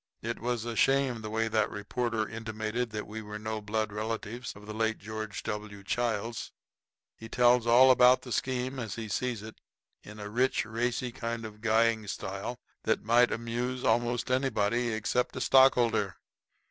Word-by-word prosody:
It - - -3
was 120 -1 -2
a 120 -1 -4
shame 135 -2 +2
the 110 - -5
way 115 +1 0
that 110 -1 +1
reporter 110 +1 -2
intimated 110 +1 -3
that 105 -1 -5
we 110 +2 -7
were 105 0 -7
no 110 0 -4
blood 110 0 -2
relatives 110 +2 -4
of 100 +1 -13
the 105 - -6
late 110 0 0
George 110 -1 -6
W. 105 -1 -5
Childs. 115 +1 -2 0.6
He 115 - -10
tells 120 -1 +4
all 130 +3 +7
about 125 0 +6
the 125 - -9
scheme 130 +2 -1
as 115 -4 -4
he 115 -1 -5
sees 115 +1 -2
it, 110 0 -11 0.4
in 105 0 -11
a 105 - -6
rich, 125 +4 +1
racy 120 +2 -1
kind 115 0 -4
of 110 -1 -8
a - - -23
guying 110 -1 +2
style 100 +4 -4 0.3
that - - +1
might 120 +2 +4
amuse 120 +2 -3
most 120 +2 +1
anybody 120 -2 +1
except 110 +3 -1
a - - -3
stockholder. 120 -7 +4
115 Hz, 170 wpm, -30 LUFS, 110-120 Hz, 0.6 s, all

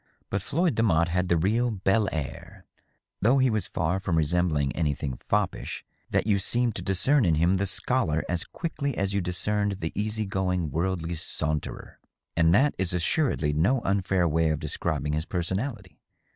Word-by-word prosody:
But 100 - 0
Floyd 170 - 0
Demotte 85 -7 +2
had 90 +1 0
the 85 - +3
real 110 +9 +1
bd 100 +1 +1
air, 85 +6 -6 0.6
though 120 +7 +4
he 130 -2 +3
was 110 -2 0
so - - -13
far 85 +4 0
from 95 -4 -1
resembling 80 -3 +1
anything 70 -5 -2
foppish - - -1 0.2
that - - +1
you 105 -2 +2
seemed 120 +4 +1
to - - -4
discern 130 +9 +3
in 85 -5 +3
him 85 +5 +3
the 100 +1 +1
scholar 85 -9 +1
as 85 -1 -1
quickly 145 -6 -4
as 100 +1 -1
you 100 - +1
discerned 100 +3 0
the 80 -4 -4
easy 110 +1 -2
going 90 -5 -1
worldly 85 +1 -1
saunterer. 75 -2 -3 0.4
And 80 0 +4
that 135 +10 +4
is 95 -2 0
assuredly 90 - +1
no 95 - +2
unfair 95 -3 +1
way 80 0 +2
of 80 - +1
describing 75 +1 -2
his 80 +2 -1
personality. 95 +4 -3
95 Hz, 170 wpm, -27 LUFS, 80-105 Hz, 0.6 s, though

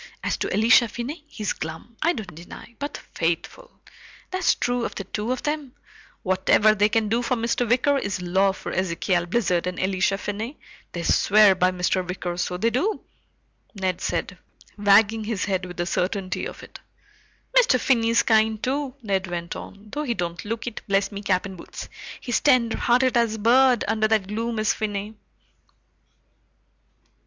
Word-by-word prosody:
As - - 0
to - - -3
Elisha 230 +3 +5
Finney, 265 +8 -6
he's 210 -8 -3
glum, 160 +9 -7
I 335 +3 +3
don't 200 - -7
deny, 170 +8 -11
but 285 +1 -4 0.2
faithful! 175 - -2 0.6
That's 370 -1 +2
true 245 0 -1
of - - -4
the 195 - -4
two 210 +4 -3
of 255 - -3
them 295 -4 -3 0.5
whatever 190 +3 +4
they 210 0 +3
can 225 0 +1
do 230 +3 +1
for 250 +1 0
Mr. 235 0 -1
Wicker 275 +4 +3
is 200 -6 -3
law 190 +2 +2
for 190 - -7
Ezekial 175 -1 0
Blizzard 180 -5 +1
and 180 -1 -4
Elisha 190 +1 +1
Finney. 215 +7 -5 0.4
They 170 - -4
swear 210 +2 +5
by 185 0 +2
Mr. 185 0 0
Wicker, 180 -1 -4
so 180 0 -2
they 230 +5 +1
do," 340 - 0 0.7
Ned 185 -2 -2
said, - - -3 0.4
wagging 210 +2 +4
his 215 -4 -2
head 190 -2 -1
with 180 - -10
the 175 - -1
certainty 185 +1 -2
of - - -10
it. - - -12 0.8
"Mr. 445 - +5
Finney's 230 -2 +3
kind, 220 -1 +2
too," 275 0 -1
Ned 190 -3 -1
went 170 0 -4
on, 200 +2 -10
"though 295 - -3
he 250 -6 -1
don't 175 -2 -4
look 225 +2 -4
it, 240 -3 -5
bless 195 0 +1
me 200 0 -6
cap 190 -2 +1
and 190 -1 -7
boots! - - -9 0.3
He's 245 - -1
tenderhearted 250 -1 +3
as 230 -2 +2
a - - -6
bird, 245 +2 +4
under 215 0 +2
that 215 -3 +2
gloom, 225 +2 -2
is 215 -1 +2
Finney." 210 0 -4
215 Hz, 170 wpm, -24 LUFS, 190-240 Hz, 0.8 s, Elisha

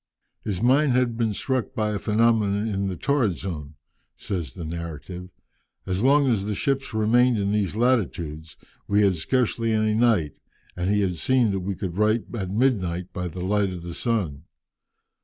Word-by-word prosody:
"His 100 0 -3
mind 135 +2 +4
had 125 -2 +1
been 115 -2 0
struck 130 -2 -2
by 105 -1 0
a 105 - -2
phenomenon 110 -1 +2
in 100 -2 -1
the 95 - -3
torrid 120 - +1
zone," 75 -6 -6 0.4
says 85 -10 -4
the 85 - -6
narrative. 85 +2 -6 0.6
"As 95 +1 -1
long 140 +3 +4
as 110 -7 +1
the 105 0 -2
ships 135 +2 -1
remained 120 +3 +3
in 100 -1 0
these 105 -2 0
latitudes, 85 -10 -1 0.3
we 100 +1 +3
had 100 - +5
had 90 - -4
scarcely 115 +4 0
any 110 -1 +2
night, 110 - +2 0.4
and 90 +1 -1
he 105 0 +2
had 90 -3 -1
seen 125 +4 +2
that 95 - -1
we 95 +1 -3
could 90 -1 -5
write 110 +2 +3
at 95 -6 -3
midnight 95 -6 0
by 90 -1 -3
the 90 +1 -6
light 100 0 +1
of 90 -2 -7
the 85 -1 -6
sun. 85 - -2
105 Hz, 180 wpm, -24 LUFS, 90-115 Hz, 0.6 s, had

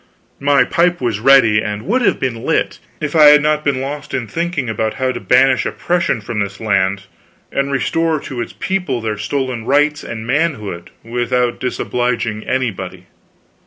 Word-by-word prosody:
My 140 0 +4
pipe 175 +1 +1
was 115 -5 -1
ready 115 -4 +5
and 105 0 -4
would 250 - 0
have - - +2
been 120 -3 -2
lit, - - 0 0.2
if 150 +1 -3
I 155 -2 +7
had 150 0 +8
not 150 0 +1
been 140 -3 0
lost 145 +2 -5
in 120 - -2
thinking 170 - -3
about 110 -1 -2
how 130 -1 0
to - - -5
banish 130 +1 +3
oppression 170 -9 -1
from 105 +1 -4
this 100 0 -3
land 100 -2 0 0.5
and 140 0 -1
restore 160 +3 0
to 130 - -8
all - - -1
its - - -5
people 180 -10 -1
their 110 -2 -3
stolen 130 0 -2
rights 145 +4 +2
and 110 -1 -6
manhood 120 - -2
without 120 +1 -1
disobliging 120 -3 -2
anybody. 95 -8 -3
125 Hz, 170 wpm, -17 LUFS, 110-145 Hz, 0.5 s, had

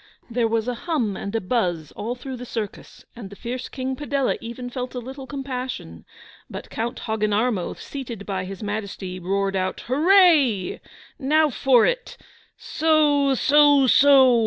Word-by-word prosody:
There 230 -1 +1
was 225 0 -1
a 250 - 0 0.2
hum 240 - 0
and 200 +3 -5
a - - +2
buzz 180 - -1
all 235 +4 -4
through 255 +1 -7
the 245 - -8
circus, 220 -4 -7
and 225 -5 -9
the 200 - -11
fierce 245 +4 -5
King 260 0 -4
Padella 280 -1 -1
even 235 +2 -7
felt 250 +1 -5
a - - -2
little 265 +2 -9
compassion. 255 - -6 0.4
But - - -8
Count 230 +2 -4
Hogginarmo, 215 -2 0
seated 235 -7 -7
by 190 -2 -3
His 195 +2 -8
Majesty, 200 -3 -5
roared 195 +2 -1
out 185 0 -2
'Hurray! 295 - +3 0.4
Now 305 +2 +3
for 255 -2 +4
it! - - -2 0.4
Soo 295 -3 +2
soo 290 0 +5
soo! 260 -2 +6
245 Hz, 155 wpm, -23 LUFS, 205-275 Hz, 0.4 s, soo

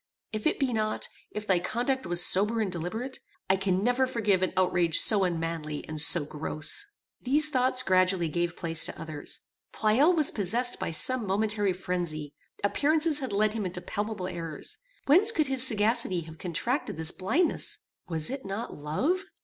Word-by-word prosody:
If 215 +4 -2
it - - 0
be 265 -4 -1
not, 215 -1 -2 0.2
if 210 0 -6
thy 190 -3 +2
conduct 245 +5 -2
was 175 0 +2
sober 210 +5 +3
and 210 -4 -1
deliberate, 205 +10 -5 0.3
I - - +3
can 190 0 -1
never 245 +2 +1
forgive 210 -7 0
an 185 - 0
outrage 175 -3 +3
so 205 -3 +5
unmanly, 165 -3 -4
and 155 -1 -2
so 160 -1 +6
gross. 155 - 0 0.3
These 300 +4 +2
thoughts 255 -1 +2
gradually 185 -3 +2
gave 175 +2 -2
place 165 -2 0
to - - -3
others. 155 -2 -3 0.3
Pleyel 245 +11 +2
was 310 -3 +3
possessed 230 +5 +2
by - - -3
some 235 +7 +4
momentary 205 0 +1
phrenzy: 175 -5 -4 0.3
appearances 305 +7 +2
had 265 -5 -5
led 210 +1 +1
him 220 -2 -3
into 180 -1 -4
palpable 205 +1 -5
errors. 165 -4 -5 0.3
Whence 375 +10 +6
could 310 -8 0
his 265 -1 +2
sagacity 215 -4 +1
have 160 0 -12
contracted 195 - -3
this 160 +1 +1
blindness? 280 - -1 0.3
Was 160 +1 -1
it 270 0 -6
not 200 +5 -6
love? 270 - -2
200 Hz, 170 wpm, -27 LUFS, 175-250 Hz, 0.3 s, so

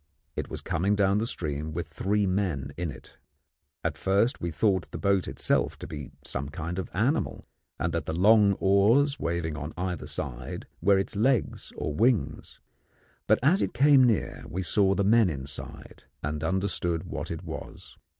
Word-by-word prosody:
It - - -4
was - - -5
coming 100 +5 0
down 100 0 +3
the 115 - 0
stream 75 -5 -3
with 85 0 -3
three 100 +5 0
men 90 -8 -1
in 85 -1 -3
it. 70 - -12 0.6
At 80 -2 -2
first 100 +6 +2
we 85 - -1
thought 95 +4 +1
the - - -6
boat 100 -2 +1
itself - - +1
to - - -8
be 75 -2 -7 0.2
some 70 0 -3
kind 85 +3 -4
of 95 - -4
an - - -16
animal, 145 +5 -1 0.3
and 85 0 -1
that 85 - -2
the 80 - -2
long 105 0 +6
oars 115 +10 +3
waving 85 -2 -2
on 75 +1 -6
either 90 -3 -3
side - - -5 0.2
were 100 0 +5
its 95 - -2
legs 120 +2 +1
or 75 - -3
wings; 115 - 0 0.7
but - - +5
as 175 +9 +4
it - - -1
came 140 +1 +6
near 105 - +1
we 95 +5 -3
saw 95 +1 +3
the 100 - +1
men 110 0 +5
inside, 70 -1 -8 0.2
and 75 +1 -3
understood 85 -2 -1
what - - -5
it - - -5
was. - - -8
95 Hz, 180 wpm, -27 LUFS, 80-105 Hz, 0.7 s, long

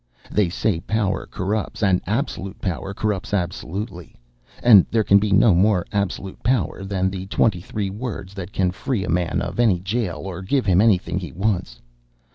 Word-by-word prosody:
They 105 -4 +2
say 90 0 0
power 105 +1 -1
corrupts; 105 +3 -3
and 95 -3 +3
absolute 105 - -3
power 95 +1 -3
corrupts 105 -1 -2
absolutely. 90 -1 -4 0.5
And 105 -7 +8
there 110 -1 +2
can 100 0 +5
be 105 0 -1
no 100 +1 +6
more 95 +1 +3
absolute 100 -2 -3
power 105 -6 0
than 95 -1 -1
the 95 0 -6
twenty 100 -2 +1
three 100 +1 -3
words 100 -3 -6
that 95 -1 -7
can 90 -2 +1
free 100 +3 -2
a - - -6
man 85 0 0
of 85 +6 -5
any 110 -7 +4
jail 95 -5 -2
or 95 -1 -5
give 125 +7 0
him 95 -1 +4
anything 95 -5 +2
he 90 - -7
wants. 90 - -2
95 Hz, 175 wpm, -22 LUFS, 90-105 Hz, 0.5 s, And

